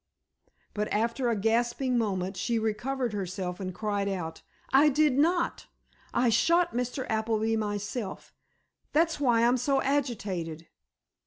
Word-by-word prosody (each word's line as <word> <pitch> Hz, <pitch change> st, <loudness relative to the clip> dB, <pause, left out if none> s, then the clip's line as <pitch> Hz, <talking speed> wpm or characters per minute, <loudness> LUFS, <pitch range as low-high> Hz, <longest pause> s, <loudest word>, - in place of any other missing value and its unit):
But 210 Hz, 0 st, -1 dB
after 230 Hz, +3 st, 0 dB
a 230 Hz, -, +1 dB
gasping 235 Hz, +4 st, +1 dB
moment, 195 Hz, -4 st, -1 dB
she 235 Hz, +4 st, -1 dB
recovered 235 Hz, +3 st, -1 dB
herself, 185 Hz, -2 st, -4 dB
and 185 Hz, -1 st, -4 dB
cried 205 Hz, 0 st, -2 dB
out: 165 Hz, -4 st, -4 dB, 0.3 s
"I 285 Hz, +3 st, +7 dB
did 300 Hz, 0 st, +3 dB
not! 335 Hz, +5 st, +1 dB, 0.4 s
I 245 Hz, 0 st, +2 dB
shot 335 Hz, +9 st, +3 dB
Mr. 250 Hz, +2 st, -2 dB
Appleby 220 Hz, 0 st, 0 dB
myself. 205 Hz, 0 st, -4 dB, 0.6 s
That's 325 Hz, 0 st, +2 dB
why 240 Hz, -5 st, +3 dB
I'm 245 Hz, +2 st, +4 dB
so 270 Hz, +2 st, +1 dB
agitated." 200 Hz, -, -2 dB
230 Hz, 130 wpm, -28 LUFS, 205-260 Hz, 0.6 s, I